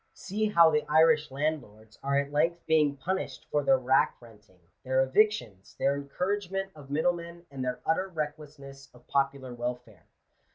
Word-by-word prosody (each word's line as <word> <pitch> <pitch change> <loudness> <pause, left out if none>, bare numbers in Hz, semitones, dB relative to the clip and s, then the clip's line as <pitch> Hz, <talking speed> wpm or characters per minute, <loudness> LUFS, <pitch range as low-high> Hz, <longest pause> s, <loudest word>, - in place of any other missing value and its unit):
See 215 +3 -2
how 170 -5 +6
the 150 -1 +1
Irish 155 -1 +4
landlords 130 -7 -4
are 140 0 0
at 140 0 -1
length 165 +4 0
being 150 -3 +2
punished 190 +7 -4
for 150 - +2
their 135 -1 +4
rack 130 +1 +2
renting, 105 -6 -19 0.2
their 130 0 +2
evictions, 130 - 0
their 140 +1 +1
encouragement 195 +6 -3
of 145 -3 -13
middlemen, 170 +3 -2
and 135 -2 -5
their 125 0 -3
utter 175 +4 +1
recklessness 150 -4 -7
of 125 - -19
popular 135 -2 -1
welfare. 120 -3 -6
145 Hz, 155 wpm, -28 LUFS, 130-165 Hz, 0.2 s, how